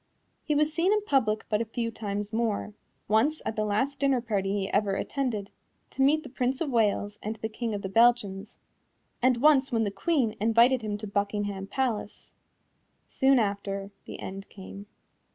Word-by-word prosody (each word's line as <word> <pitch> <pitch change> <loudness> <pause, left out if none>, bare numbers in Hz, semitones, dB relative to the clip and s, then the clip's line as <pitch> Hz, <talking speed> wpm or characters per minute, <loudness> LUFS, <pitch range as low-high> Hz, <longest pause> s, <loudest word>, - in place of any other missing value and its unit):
He 300 - -1
was 300 +1 +2
seen 345 +4 +2
in 425 -1 +2
public 240 - +1
but 210 0 0
a - - -1
few 230 +1 -3
times 205 -1 -4
more 220 -2 -1 0.3
once 240 +9 +2
at 220 - -2
the 215 - 0
last 215 +7 -1
dinner 275 -2 +2
party 205 -5 -1
he 190 - -3
ever 200 -1 +1
attended, 225 -6 -3 0.4
to 270 - -3
meet 300 +3 +4
the 280 - -9
Prince 255 +1 -1
of 305 -5 -2
Wales 210 -3 +1
and 215 +2 -4
the 220 - -4
King 225 0 -4
of 200 - -5
the - - -2
Belgians, 215 -2 +2 0.6
and 255 0 +3
once 275 0 +4
when 225 -2 +2
the 205 - -1
Queen 230 +1 0
invited 235 +3 +4
him 210 -1 -3
to 215 - -7
Buckingham 200 -1 -2
Palace. 235 -4 -3 0.8
Soon 265 0 +3
after, 200 -2 -2
the - - -8
end 195 +1 -7
came. 200 +1 -10
220 Hz, 180 wpm, -27 LUFS, 205-260 Hz, 0.8 s, meet